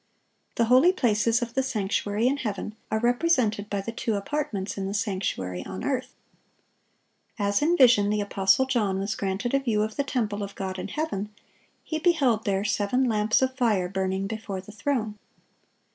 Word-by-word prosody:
The 230 - +2
holy 255 +9 +6
places 230 - +2
of 235 -1 -6
the 265 - +2
sanctuary 210 -3 -1
in 270 +3 +2
heaven 215 -5 -4 0.2
are 220 - 0
represented 240 -4 +1
by 200 -1 -1
the 230 - -5
two 230 -1 -2
apartments 200 -3 -3
in 195 -1 -3
the 200 - -3
sanctuary 185 - -2
on 95 - -7
earth. 255 -1 -2 1.2
As 200 +2 +1
in 335 +4 +3
vision 235 -6 +6
the 210 0 +1
apostle 200 +4 +2
John 220 -7 0
was 200 +2 -2
granted 200 +5 -2
a 275 - +4
view 225 -6 +1
of 215 0 -4
the 280 - +1
temple 220 -7 -2
of 200 -1 -6
God 190 -1 -4
in - - -4
heaven, 210 -4 -3 0.5
he 315 - -3
beheld 280 -10 +2
there 200 -1 0
"seven 215 +6 +1
lamps 220 0 +2
of 260 0 0
fire 215 -8 +1
burning 190 +1 -2
before 205 -2 -5
the 190 +3 -11
throne." 215 -1 -2
215 Hz, 175 wpm, -26 LUFS, 200-255 Hz, 1.2 s, holy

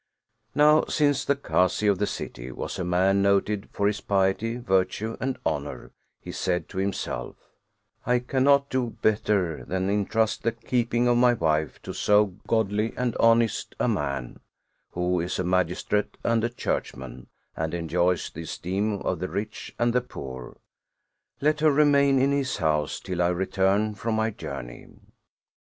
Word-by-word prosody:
Now 150 +1 +5
since 145 -3 +1
the 140 - +1
Kazi 95 -7 +1
of 100 -3 +3
the 105 - +1
city - - -6
was - - -5
a - - -1
man 95 +3 +2
noted 100 +1 +1
for 100 - -1
his 105 0 +1
piety, 100 +4 +1
virtue, 110 0 0
and 130 0 -2
honor, 75 0 -3 0.3
he - - -8
said 90 -1 -1
to 95 - -5
himself: 95 -1 -3 0.4
" - - -50 0.3
I 125 0 +4
cannot 140 +3 +2
do 125 -3 -1
better 100 -6 +1
than 95 +1 -1
intrust 105 +2 0
the 115 - 0
keeping 120 0 0
of 120 0 +3
my 120 0 +5
wife 80 - 0
to - - -6
so 105 -2 +3
godly 110 0 0
and 125 -2 -1
honest 115 -1 +2
a - - +2
man, 70 -4 -2 0.5
who 90 0 0
is 85 +2 -2
a - - -1
magistrate 90 +3 0
and 115 -1 +1
a 120 - +1
churchman, 65 - -4 0.3
and 80 +2 -2
enjoys 85 +1 0
the 80 - -7
esteem 100 +5 -2
of 90 - -1
the 90 - -3
rich 105 +2 -5
and 120 0 +1
the 125 - +3
poor; 65 - -9 0.8
let 150 +1 +2
her 155 0 +4
remain 140 -1 +4
in 135 +2 +3
his 140 -2 0
house 75 -4 0
till 90 -2 -3
I 85 - +3
return 95 +4 +1
from 110 +2 -2
my 110 +1 +1
journey." 70 - -8
105 Hz, 160 wpm, -26 LUFS, 90-120 Hz, 0.8 s, Now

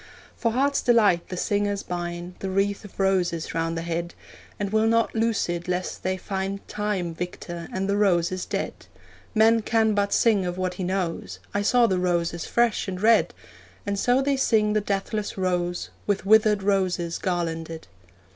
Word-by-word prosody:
For 230 -1 0
heart's 280 +3 +2
delight 210 -8 +3
the 180 - -5
singers 205 +1 0
bind 175 0 -5
The 195 - -3
wreath 195 +2 0
of 205 - -13
roses 185 -4 +1
round 165 0 -1
the 165 - -3
head, 170 0 -3 0.4
And 200 -1 -2
will 220 +1 +3
not 230 0 +2
loose 225 -1 +1
it 175 0 -3
lest 180 0 -2
they 185 0 -1
find 195 +1 -4
Time 205 -5 -2
victor, 175 0 -6
and 190 +1 -2
the 200 - +1
roses 185 -3 +1
dead. - - -2 0.6
'Man 225 +1 +5
can 220 0 +2
but 200 0 +1
sing 215 -5 +3
of 180 0 -3
what 185 -1 -1
he 185 - -5
knows 175 - -2 0.2
I 205 - +1
saw 240 +4 +4
the 190 -5 +1
roses 170 -1 0
fresh 235 -3 +1
and 185 -1 -4
red!' 225 +3 +4 0.5
And 200 -1 -1
so 250 +5 +3
they 280 0 +1
sing 215 -5 +2
the 215 - +2
deathless 205 +1 -2
rose, 175 -2 -1 0.2
With 200 -2 0
withered 215 -1 +4
roses 185 -4 0
garlanded. 165 - -3
195 Hz, 175 wpm, -25 LUFS, 175-210 Hz, 0.6 s, Man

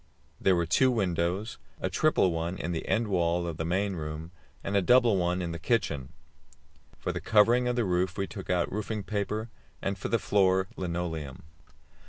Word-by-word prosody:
There 95 - +3
were 85 -1 +1
two 130 +10 +4
windows 95 -1 -1 0.2
a - - -1
triple 95 - +2
one 85 +2 -2
in 85 - -3
the 80 - -4
end 115 0 +1
wall 85 -3 +1
of 85 -3 -4
the 80 - -2
main 95 +3 0
room, 80 +1 -6 0.3
and 100 - -2
a 100 - +4
double 120 +2 +5
one 90 0 0
in 85 - -3
the 85 - -5
kitchen. 80 - -1 0.9
For - - -3
the - - -4
covering 115 +3 +4
of 125 - 0
the 120 -2 +1
roof 90 +1 0
we 100 - 0
took 95 -1 -9
out 90 -2 +1
roofing 105 +1 -3
paper, 105 +2 -2 0.3
and 95 0 -3
for - - -3
the 115 - +2
floor 95 -3 +2
linoleum. 85 -6 -4
95 Hz, 190 wpm, -29 LUFS, 85-105 Hz, 0.9 s, double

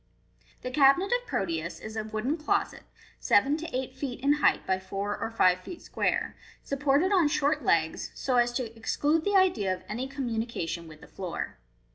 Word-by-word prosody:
The 255 - -4
Cabinet 280 - +4
of - - 0
Proteus 170 -2 -2
is 220 0 -8
a 220 - -2
wooden 220 +7 -2
closet, 400 +6 -1 0.3
seven 270 +8 +3
to 330 +1 -6
eight 260 0 -3
feet 260 -2 -5
in 280 +2 +4
height - - +3
by 190 0 +1
four 195 +2 -3
or - - -3
five 185 -5 +3
feet 340 - -9
square, - - -1 0.3
supported 285 +6 +1
on 360 -6 +4
short 295 +1 +1
legs, - - +1
so 255 -2 0
as 240 0 +3
to 240 -3 -3
exclude 295 +7 0
the 405 +3 +1
idea 290 - +3
of 185 - -4
any 245 +5 -4
communica 235 - -3
tion 170 0 -5
with 155 -1 -13
the - - -13
floor. 185 - -5
255 Hz, 185 wpm, -28 LUFS, 205-295 Hz, 0.3 s, Cabinet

